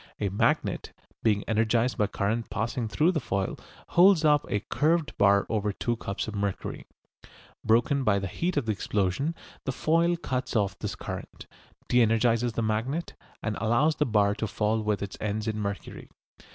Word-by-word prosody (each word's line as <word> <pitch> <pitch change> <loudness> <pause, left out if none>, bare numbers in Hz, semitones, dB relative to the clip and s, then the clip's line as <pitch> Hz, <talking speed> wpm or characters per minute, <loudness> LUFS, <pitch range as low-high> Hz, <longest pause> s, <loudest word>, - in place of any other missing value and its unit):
A 100 - 0
magnet, 100 - 0 0.3
being 105 -3 +2
energised 115 +3 +2
by 105 - +1
current 110 +3 -2
passing 115 +2 -2
through 150 - +2
the 165 - 0
foil, 95 -7 -2 0.3
holds 175 -2 +5
up 150 -1 +4
a 105 - 0
curved 155 +6 0
bar 100 0 +5
over 105 -2 0
two 120 +4 -2
cups 100 -3 -4
of 110 - -5
mercury. 100 -2 -3 0.8
Broken 120 +5 +3
by 105 -5 +3
the 100 - -2
heat 170 - -2
of 140 - +1
the 110 - 0
explosion, 105 - -1 0.3
the 135 - -1
foil 165 +5 +2
cuts 130 -6 -3
off 100 -3 +1
this - - -4
current, - - -7 0.4
de 125 -1 +4
energises 115 +1 +2
the 115 - -1
magnet, 115 +10 -2 0.3
and 105 -1 -1
allows 120 +8 +2
the 150 - +1
bar 105 -3 +3
to 110 - -3
fall 110 +1 0
with 105 -1 -1
its 100 - -6
ends 110 +1 -2
in 110 -1 -1
the - - -3
mercury. 100 -2 -5
110 Hz, 180 wpm, -27 LUFS, 105-130 Hz, 0.8 s, holds